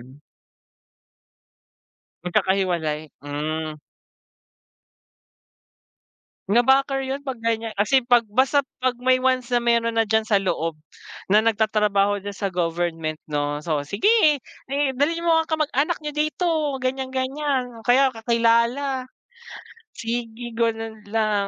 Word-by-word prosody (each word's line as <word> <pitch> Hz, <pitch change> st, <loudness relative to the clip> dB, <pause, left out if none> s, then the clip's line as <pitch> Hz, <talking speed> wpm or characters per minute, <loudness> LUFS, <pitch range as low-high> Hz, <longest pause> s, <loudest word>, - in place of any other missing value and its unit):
Mm. 130 Hz, +4 st, -16 dB, 2.0 s
Magkakahiwalay, 175 Hz, -5 st, 0 dB
mm. 155 Hz, +1 st, -4 dB, 2.7 s
Na-backer 270 Hz, +5 st, +3 dB
yun 265 Hz, +1 st, -3 dB
'pag 260 Hz, -4 st, -5 dB
gan'yan, 225 Hz, -1 st, -1 dB
kasi 215 Hz, +7 st, +3 dB
pag 245 Hz, -1 st, +4 dB
basta 265 Hz, +4 st, +3 dB, 0.2 s
pag 255 Hz, -1 st, 0 dB
may 255 Hz, 0 st, +4 dB
once 255 Hz, -1 st, 0 dB
na 240 Hz, -, +3 dB
meron 235 Hz, -1 st, +1 dB
na 225 Hz, -, +2 dB
diyan 220 Hz, +1 st, +2 dB
sa 210 Hz, -3 st, +3 dB
loob 165 Hz, -5 st, -2 dB, 0.5 s
na 210 Hz, +3 st, +4 dB
nagtatrabaho 210 Hz, -2 st, +2 dB
diyan 200 Hz, -1 st, -6 dB
sa 200 Hz, -, -1 dB
government 165 Hz, -2 st, -2 dB
'no, 145 Hz, -1 st, -2 dB
so, 150 Hz, -2 st, -2 dB
"Sige 300 Hz, -, +3 dB, 0.6 s
dalhin 330 Hz, +5 st, 0 dB
mo 325 Hz, -1 st, +4 dB
ang -, -, -21 dB
kamag 310 Hz, -2 st, 0 dB
anak 305 Hz, +5 st, +1 dB
niyo 300 Hz, -1 st, -5 dB
dito 310 Hz, +4 st, 0 dB, 0.3 s
ganyan-ganyan 260 Hz, -1 st, -2 dB
kaya 265 Hz, +3 st, +5 dB
kakilala." 235 Hz, +4 st, +1 dB, 0.9 s
Sige 230 Hz, 0 st, -5 dB
go 230 Hz, 0 st, +2 dB
na 225 Hz, 0 st, -6 dB, 0.2 s
lang. 210 Hz, -1 st, 0 dB
230 Hz, 115 wpm, -23 LUFS, 195-265 Hz, 2.7 s, kaya